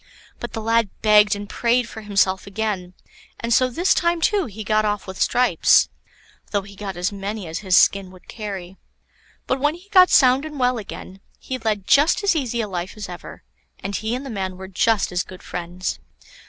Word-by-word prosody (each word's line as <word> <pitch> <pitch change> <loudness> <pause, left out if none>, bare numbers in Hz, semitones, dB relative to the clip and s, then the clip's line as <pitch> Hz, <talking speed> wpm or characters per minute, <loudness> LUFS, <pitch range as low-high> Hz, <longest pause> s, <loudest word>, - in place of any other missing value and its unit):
But - - -6
the 225 - -4
lad 230 -1 +2
begged 210 -1 +5
and 205 0 -7
prayed 240 +3 +1
for 220 - -9
himself 195 -2 +1
again, 200 -3 -3 0.4
and 235 0 0
so 255 +2 +4
this 345 +10 +2
time 340 0 +1
too 390 +1 +1
he 215 0 -8
got 215 0 +2
off 205 -1 -1
with 190 -1 -7
stripes; 245 -9 +4 0.6
though 200 -2 -1
he 200 0 -13
got 195 -2 -6
as 180 +3 -1
many 200 0 -5
as 160 0 -5
his 185 -3 +3
skin 195 -2 +4
would 185 -1 -17
carry. 195 -4 -7 0.7
But 260 - -1
when 295 +3 +1
he 365 +4 -17
got 370 -2 +7
sound 260 0 +5
and 310 -1 -7
well 250 -1 +2
again, 195 -2 -9 0.2
he 260 -1 -5
led 215 -4 -2
just 295 - +4
as 395 -3 +3
easy 245 -6 -1
a 215 - -3
life 185 +1 -5
as 210 - -6
ever, 175 - -10 0.4
and 195 +1 -3
he 220 +4 -2
and 260 +2 -6
the 270 - -6
man 190 -3 -4
were 190 0 -8
just 200 +2 +1
as 180 0 0
good 185 0 -11
friends. 180 +1 -5
210 Hz, 205 wpm, -22 LUFS, 190-250 Hz, 0.7 s, got